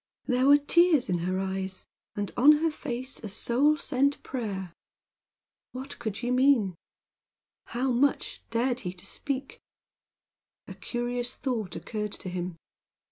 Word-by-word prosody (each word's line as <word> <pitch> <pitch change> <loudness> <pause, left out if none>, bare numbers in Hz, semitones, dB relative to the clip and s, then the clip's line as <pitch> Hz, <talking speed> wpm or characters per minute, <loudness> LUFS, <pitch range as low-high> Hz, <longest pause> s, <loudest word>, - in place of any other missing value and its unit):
There 255 0 +2
were 285 +1 +9
tears 305 -2 +4
in 175 -1 +1
her 185 +2 -1
eyes, 190 0 -3 0.3
and 205 -1 -3
on 285 +5 +8
her 315 +2 +2
face 260 -3 -5
a 215 - -4
soul 265 +9 +3
sent 280 0 0
prayer. 195 -8 -4 1.0
What 260 +3 -7
could 220 -4 -3
she 245 0 -2
mean? 250 -7 +4 0.9
How 255 +3 -1
much 270 +4 +1
dared 245 +2 +1
he 180 -5 -5
to 185 +1 -12
speak? 270 +5 -4 1.1
A - - -7
curious 245 0 -3
thought 235 -7 -3
occurred 210 -2 -4
to 185 - -6
him. 180 -1 -4
245 Hz, 135 wpm, -28 LUFS, 200-270 Hz, 1.1 s, were